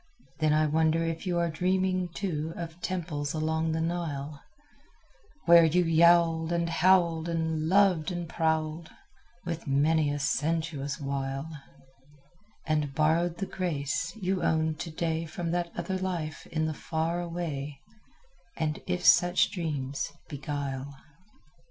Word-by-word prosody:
Then 155 -1 +3
I 155 +1 +3
wonder 160 +2 +2
if 165 +3 -3
you 175 -1 0
are 170 -1 +1
dreaming, 185 +2 0
too, 160 -5 -2
Of 170 0 -7
temples 160 -6 -3
along 160 +1 0
the 160 - -1
Nile, 155 -4 -3 1.0
Where 170 0 +8
you 175 +3 +3
yowled 165 0 +4
and 170 0 +1
howled, 170 -1 +3
and 160 -1 -1
loved 190 -4 +4
and 175 -2 -4
prowled, 160 0 -1 0.6
With 165 -2 -4
many 150 +2 +3
a 145 - -1
sensuous 150 -1 -1
wile, 140 +2 -3 1.1
And 150 -3 0
borrowed 165 +2 +2
the 195 - -2
grace 165 -3 -2
you 190 -3 -1
own 160 0 +1
today 160 +1 -3
From 165 +1 -4
that 175 0 -1
other 185 +2 -2
life 175 -5 -4
in 160 -1 -1
the 155 - -1
far 165 +2 -2
away; 155 -5 -4 0.8
And 155 -1 -2
if 180 -1 -2
such 175 0 +5
dreams 145 -6 -3 0.2
beguile. 140 -2 -4
160 Hz, 130 wpm, -28 LUFS, 155-175 Hz, 1.1 s, Where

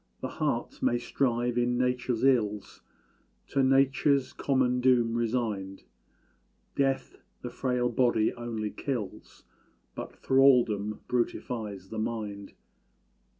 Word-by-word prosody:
The - - -4
heart - - -1
may 120 - +2
strive 120 -1 0
in 120 0 +1
Nature's 125 -1 0
ills, 105 -6 +1 0.7
To 140 - +1
Nature's 135 +1 +3
common 130 -2 +1
doom 120 -3 +3
resigned: 110 -5 -2 0.9
Death 135 -1 0 0.3
the 120 - -5
frail 125 -2 0
body 120 -2 +2
only 115 -3 -4
kills 120 -9 -5 0.5
But - - -7
thraldom 120 -6 +3
brutifies 110 -5 -3
the 110 - -5
mind. 105 -3 -4
120 Hz, 105 wpm, -28 LUFS, 110-130 Hz, 0.9 s, Nature's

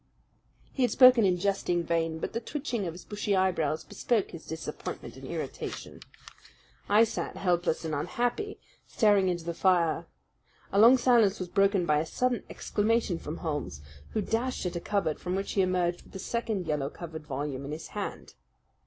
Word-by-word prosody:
He 270 - -2
had 250 - +4
spoken 255 -1 +7
in 180 -2 +3
jesting 180 -2 0
vein, 165 -1 0
but - - -4
the 230 - -1
twitching 240 -5 -3
of 165 - -4
his 175 - -11
bushy 210 -1 -1
eyebrows 175 -5 +1
bespoke 225 -5 -1
his 165 -2 -10
disappointment 160 0 -6
and - - -10
irritation. - - -5 0.9
I 210 +3 +6
sat 225 - -3
helpless 175 -3 0
and 160 - -2
unhappy, 245 - -2 0.3
staring 205 -4 +3
into 175 -2 -2
the 170 - -2
fire. 170 -2 +2 0.6
A 200 - +2
long 235 +5 +8
silence 235 -5 +4
was 185 -1 -5
broken 195 -2 +3
by 150 -2 +3
a 160 - -2
sudden 250 +4 0
exclamation 210 -4 0
from 155 +3 -6
Holmes, 145 - -4 0.3
who 215 - 0
dashed 230 +2 -1
at 180 0 -2
a 170 - -3
cupboard, 190 -7 -1
from 180 +1 -2
which 195 +1 -2
he 195 - +2
emerged 180 -2 +1
with - - -18
a - - -3
second 220 -2 -2
yellow 150 -3 -1
covered 160 -2 -8
volume 140 -1 -3
in 140 - -6
his 155 +2 -6
hand. 205 - -6
185 Hz, 180 wpm, -29 LUFS, 165-215 Hz, 0.9 s, long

